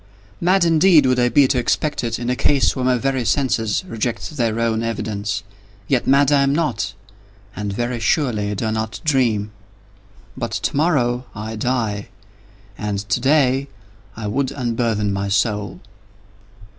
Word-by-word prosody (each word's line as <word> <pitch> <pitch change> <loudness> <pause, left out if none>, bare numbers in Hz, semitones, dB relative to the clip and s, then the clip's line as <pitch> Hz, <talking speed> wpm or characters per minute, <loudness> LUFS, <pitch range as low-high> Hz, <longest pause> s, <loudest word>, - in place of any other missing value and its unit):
Mad 185 +1 +3
indeed 165 -2 +5
would 130 -1 +2
I 125 0 +3
be 140 +1 +5
to 130 -1 +1
expect 150 +4 0
it, 115 -1 -2
in 120 +1 -2
a - - 0
case 140 +1 +2
where 130 - -2
my 125 0 +3
very 130 0 -1
senses 115 - 0
reject 115 - -3
their 115 -4 0
own 115 -1 0
evidence. 105 -2 -3 0.4
Yet, 130 -3 +1
mad 140 +1 +4
am 140 -1 +4
I - - +1
not—and 100 - -5
very 120 +4 -2
surely 110 -7 0
do 110 - -3
I 110 - 0
not 110 0 -3
dream. 120 -8 +1 0.8
But - - -4
to - - -2
morrow 130 -6 +1
I 110 +1 -5
die, 110 -3 -1 0.7
and 105 -1 -2
to - - +1
day 135 0 +2 0.5
I 110 - -5
would 130 +6 -1
unburthen 115 -5 -1
my 100 0 -2
soul. 105 0 0
120 Hz, 155 wpm, -20 LUFS, 105-135 Hz, 0.8 s, indeed